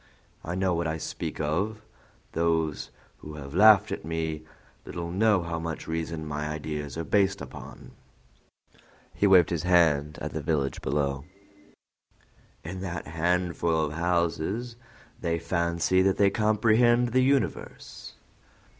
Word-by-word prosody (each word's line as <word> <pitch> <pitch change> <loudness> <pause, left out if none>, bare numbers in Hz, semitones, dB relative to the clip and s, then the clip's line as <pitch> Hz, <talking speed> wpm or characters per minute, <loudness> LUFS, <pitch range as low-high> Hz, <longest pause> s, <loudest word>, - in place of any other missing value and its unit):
I 85 +2 -4
know 95 -1 +1
what 85 -1 -1
I 80 0 -2
speak - - -5
of; 95 +9 -1 0.5
those 80 -2 0 0.3
who 75 0 -9
have 70 -2 -9
laughed 105 +2 +6
at - - -4
me 80 -1 -3 0.4
little 85 0 -6
know 100 -1 +3
how 85 -1 -3
much 80 -1 -5
reason 80 -1 -3
my 75 0 -3
ideas 75 -1 -5
are 85 - -2
based 100 +3 +2
upon." 65 - -10 1.2
He 100 - +2
waved 90 -4 +6
his 85 -3 -1
hand 80 -5 +3
toward - - -6
the - - -4
village 75 -4 -1
below. 70 -1 -1 1.4
"In 95 +3 -6
that 85 -4 -5
handful 85 0 0
of 75 -1 -1
houses 85 +7 -1 0.4
they 85 -1 -1
fancy 85 +2 +1
that 95 0 +2
they 100 -1 +4
comprehend 115 +3 +3
the 130 +2 +2
universe." 135 -2 -2
85 Hz, 135 wpm, -27 LUFS, 80-95 Hz, 1.4 s, laughed